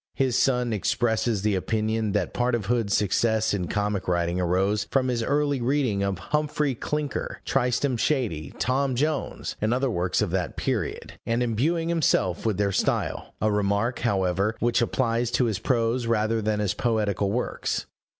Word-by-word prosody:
His 130 -3 +1
son 125 -3 +2
expresses 110 0 0
the 105 -1 +2
opinion 110 +2 0
that 105 - -1
part 125 0 +1
of 110 -4 -3
Hood's 115 -2 +1
success 110 +2 +1
in 90 -4 -1
comic 105 0 -1
writing 85 0 0
arose 95 +4 +1
from 130 -1 +1
his 120 -2 0
early 145 +1 +1
reading 125 -5 +1
of 100 -1 0
Humphrey 150 - -1
Clinker, 150 +4 -3
Tristram 125 +1 +1
Shandy, 110 - -1
Tom 130 +1 +1
Jones, 150 +3 -2
and 110 +1 +1
other 130 0 0
works 90 +1 0
of 100 - -2
that 90 -2 -2
period, - - -3
and 115 +2 +1
imbuing 155 +9 0
himself 120 - +1
with 105 -4 0
their 100 -1 +1
style: - - -1
a 110 - +1
remark, 105 +4 0
however, 100 -1 +1
which 120 0 +2
applies 120 0 0
to 125 - +3
his 110 -5 -1
prose 115 -1 0
rather 110 0 +1
than 105 0 0
his 105 -2 0
poetical 105 -4 0
works. 120 +4 -2
115 Hz, 165 wpm, -25 LUFS, 100-125 Hz, -, to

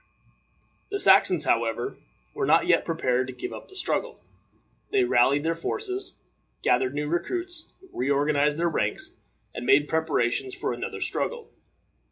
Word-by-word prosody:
The 405 0 -2
Saxons, 190 - +5
however, 115 0 0 0.4
were - - -2
not - - +4
yet - - +3
prepared 125 0 0
to 130 - -6
give 125 - -6
up - - -10
the 385 - -15
struggle. 465 +5 -2 0.7
They 400 -2 +3
rallied 145 - +3
their 165 +1 +1
forces, 380 - -4 0.5
gathered 130 +2 +2
new 150 0 -2
recruits, 345 - -3 0.2
reorganized 145 +2 +1
their 170 +1 +1
ranks, 105 -10 -2 0.4
and 125 - -6
made 135 +4 +4
preparations 135 -6 0
for - - -2
another - - -5
struggle. 480 -1 -3
150 Hz, 140 wpm, -26 LUFS, -, 0.7 s, Saxons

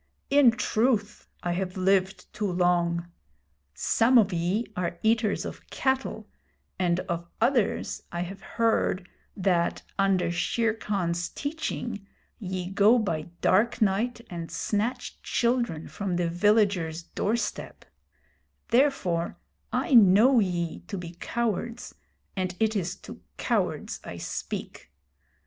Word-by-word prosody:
In 280 -3 +7
truth, 225 -2 0 0.2
I 175 - 0
have 185 +1 -3
lived 190 0 +1
too 210 -3 -1
long. 175 -1 +1 0.6
Some 230 - +3
of 205 -4 +4
ye 180 +7 0
are 175 -2 -2
eaters 220 -1 +2
of - - -8
cattle, 265 0 -1 0.5
and 175 -1 +2
of 170 -1 -4
others 235 -2 +1
I 175 - -3
have 190 +2 -6
heard 220 -5 0 0.3
that, 180 -3 +1 0.2
under 190 -3 +2
Shere 220 +6 +1
Khan's 175 -6 -2
teaching, 250 -9 -4 0.3
ye 185 -3 -4
go 205 +5 +5
by 170 -8 -2
dark 215 +6 +3
night 220 +4 +1
and 170 -2 -6
snatch 220 +4 -2
children 235 -9 0
from 195 -3 -3
the 175 -1 +1
villager's 180 -3 +2
door 210 +5 -1
step 235 - -4 0.8
Therefore 230 -10 +1 0.3
I 330 - 0
know 230 +4 +7
ye 175 -5 -1
to 200 - -4
be 175 -1 -7
cowards, 235 0 -2 0.4
and 185 -2 -2
it 220 0 +2
is 185 -2 -1
to - - -10 0.2
cowards - - -1
I - - -7
speak. - - -6
195 Hz, 125 wpm, -27 LUFS, 175-230 Hz, 0.8 s, In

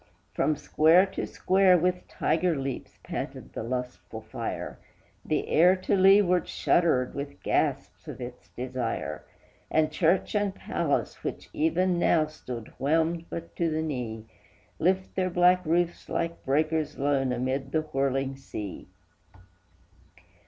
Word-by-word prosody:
From 155 - +1
square 160 +5 +4
to 190 - -4
square 190 -1 +4
with 180 +1 0
tiger 165 +2 +1
leaps 135 -2 -5
panted - - -6
the - - -4
lustful 125 +2 -5
fire, - - -5 0.4
The - - -1
air 180 +4 +5
to 185 +1 0
leeward 190 -2 +5
shuddered 145 -8 +2
with 140 +1 -3
the - - -19
gasps - - -1
of - - -7
its 125 0 -9
desire; 125 -2 -4 0.5
And 155 -1 +2
church 170 +4 +2
and 205 -2 0
palace, - - -2
which - - -5
even 185 - +1
now 160 -2 +3
stood 125 -7 -8
whelmed 165 +4 +1
but 170 0 -7
to 170 -1 +1
the 160 0 -1
knee, 120 -7 -4 0.5
Lift 185 +3 +1
their 185 -1 +1
black 180 +1 +4
roofs 175 +1 0
like 170 0 -2
breakers 155 +3 0
lone 135 -2 +1
amid 130 +2 -2
the 155 - +2
whirling 135 -2 -1
sea. 105 -7 -7
155 Hz, 135 wpm, -27 LUFS, 135-180 Hz, 0.5 s, air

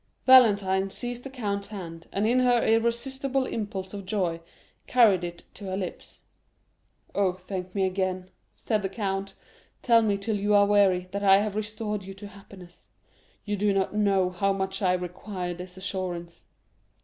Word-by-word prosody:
Valentine 200 -7 +5
seized 245 +3 -4
the 270 - -7
count's 205 -6 -3
hand, 165 -5 -8
and 200 +2 0
in 245 +3 +3
her 245 -2 +3
irresistible 255 +4 0
impulse 200 -5 -5
of 200 -1 -6
joy 185 -4 -1 0.5
carried 215 -8 +4
it 175 0 -6
to 205 - -10
her 190 0 -3
lips. 185 -3 -7 0.9
50275m - - -3
"Oh, 190 -2 +3
thank 185 0 -7
me 195 -1 +2
again!" 185 -1 -2 0.2
said 215 -2 -2
the 195 - -2
count; 195 -1 -3 0.5
"tell 230 -2 +5
me 210 -3 +1
till 205 +1 -2
you 205 +1 +2
are 205 0 +6
weary, 195 -3 +3
that 200 +1 -3
I 195 -1 +7
have 205 0 -1
restored 215 -1 -3
you 195 +1 -9
to 200 +1 -10
happiness; 195 -3 -15 0.6
you 205 -1 -1
do 205 0 +1
not 195 +1 0
know 195 -3 +2
how 195 +2 0
much 195 0 -3
I 185 -2 +3
require 180 0 -4
this 180 +1 -10
assurance." 185 -3 -5
200 Hz, 170 wpm, -27 LUFS, 185-215 Hz, 0.9 s, I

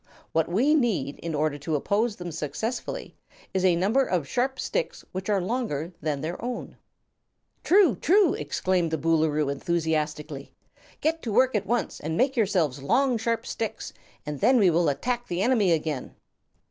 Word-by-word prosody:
What 165 0 +1
we 245 - +3
need, 220 - 0
in 165 -2 -4
order 150 -1 0
to 155 +2 -2
oppose 205 +9 0
them 175 -3 -6
successfully, 225 - -4 0.4
is 190 -1 0
a 180 -2 +4
number 210 +10 +2
of 175 - -1
sharp 260 - -1
sticks - - -3
which 185 +2 -5
are 205 -2 +3
longer 180 - -2
than 150 -2 -2
their 170 +6 -5
own." 245 0 -5 0.9
"True 385 -1 +5
true!" 380 -1 +4
exclaimed 170 +4 0
the 160 - -1
Boolooroo, 155 -2 +1
enthusiastically. 150 -2 -2 0.5
"Get 325 +1 0
to 230 - -4
work 255 +4 +4
at 205 -2 -1
once 240 +2 -1
and 160 +2 -3
make 270 +2 +2
yourselves 180 - +1
long 240 - +2
sharp 230 +1 -1
sticks, 225 -2 -4 0.3
and 150 -2 -5
then 260 - +4
we 195 -6 +5
will 165 -1 +3
attack 240 - -2
the 175 +2 -1
enemy 220 -7 +3
again." 155 -5 -2
185 Hz, 165 wpm, -26 LUFS, 155-240 Hz, 0.9 s, True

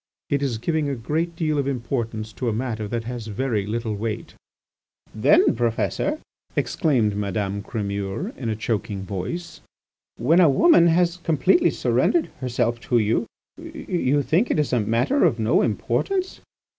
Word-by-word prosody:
It 140 -1 +1
is 130 -5 -1
giving 155 +4 -1
a 140 - -1
great 160 +8 -2
deal 155 -3 0
of 140 - -1
importance 115 -4 -3
to 125 +1 -2
a - - -1
matter 110 -2 -3
that 115 +2 -3
has 120 -1 -6
very 105 -1 -1
little 115 0 -2
weight." 110 +1 -4 0.8
"Then, - - +4
Professor," 120 - 0 0.4
exclaimed 125 - +1
Madame 100 0 -2
Crémeur 100 - -4
in 120 -4 -4
a 110 - -1
choking 105 -2 -3
voice, 105 - -5 0.6
"when 155 +10 +3
a 170 -4 +6
woman 170 - +5
has 170 +1 +2
completely 175 - +3
surrendered 340 -2 +1
herself 120 -2 -1
to 120 0 0
you, 115 +1 +1 0.3
you 185 - -1
think 165 - +1
it - - +1
is 150 -3 0
a 125 - +3
matter 115 - +1
of 115 - +3
no 110 +1 +2
importance?" 365 - -1
120 Hz, 155 wpm, -23 LUFS, 110-160 Hz, 0.8 s, a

